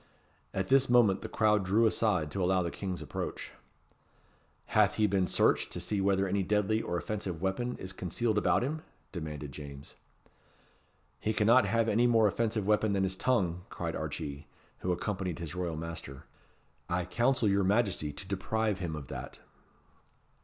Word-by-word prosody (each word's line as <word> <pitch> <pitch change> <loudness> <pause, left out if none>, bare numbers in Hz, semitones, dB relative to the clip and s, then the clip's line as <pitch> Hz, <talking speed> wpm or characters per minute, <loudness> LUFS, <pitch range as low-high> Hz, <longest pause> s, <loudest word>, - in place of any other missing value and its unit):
At - - -2
this 135 -1 +4
moment 115 -6 +4
the - - -6
crowd 105 -2 +3
drew 105 +5 +3
aside 95 -9 +1
to 95 +4 -1
allow 90 0 +2
the 85 - -3
King's 90 -5 -4
approach. 75 - -5 1.2
"Hath 105 -1 +4
he 110 - +3
been 95 -2 +2
searched - - +2
to - - -3
see 105 -2 -1
whether 100 0 +2
any 100 +1 0
deadly 105 +3 +1
or 85 - -2
offensive 95 -3 -3
weapon 95 +7 -2
is 95 0 -6
concealed 105 +4 0
about 105 - +2
him?" 155 +4 -2 0.3
demanded 75 -5 -6
James. 70 0 -9 1.3
"He 110 - -1
cannot 110 +5 +4
have 115 0 +2
any 115 +3 +3
more 115 -3 +5
offensive 110 0 0
weapon 105 0 +2
than 95 -1 +1
his 95 0 0
tongue," 90 -7 0
cried - - -4
Archee, 70 -1 -5 0.3
who 90 - -1
accompanied 90 -1 -2
his 85 -1 -6
royal 90 -3 -3
master. 80 -4 -7 0.7
"I 85 0 0
counsel 120 +4 +1
your 100 0 +3
Majesty 100 -6 +1
to 75 +6 -8
deprive 100 +1 -1
him 85 -4 -3
of 75 -2 -6
that." - - -7
95 Hz, 165 wpm, -31 LUFS, 90-110 Hz, 1.3 s, more